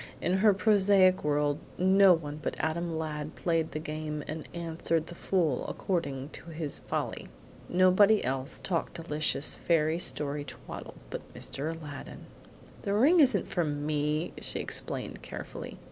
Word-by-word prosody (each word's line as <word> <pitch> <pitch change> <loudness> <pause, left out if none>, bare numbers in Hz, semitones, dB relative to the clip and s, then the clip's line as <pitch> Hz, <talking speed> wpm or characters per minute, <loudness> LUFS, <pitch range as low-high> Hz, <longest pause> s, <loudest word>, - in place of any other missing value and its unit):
In 185 +2 +1
her 210 +2 +5
prosaic 195 -1 +4
world 145 0 +1 0.2
no 190 +1 +6
one 150 -3 -4
but - - -3
Adam 165 +1 -2
Ladd 155 -1 -4
played 165 -2 0
the - - -4
game 155 -1 -4
and 155 0 -6
answered 165 -1 -1
the 175 - -9
fool 170 -6 0
according 140 -7 -2
to - - -11
his 155 -2 -4
folly. - - -3 0.4
Nobody 185 +4 +5
else 130 +2 -2
talked 170 -4 -2
delicious 155 -3 +2
fairy 160 -1 +1
story 145 -3 +2
twaddle 140 - -9 0.2
but - - -7
Mr. 145 +4 -3
Aladdin. 145 -3 -9 0.6
"The 200 - -1
ring 295 +11 +5
isn't 250 - +4
for 175 - 0
ME!" 150 +2 -1
she - - +3
explained - - -1
carefully. - - -8
160 Hz, 145 wpm, -29 LUFS, 150-185 Hz, 0.6 s, no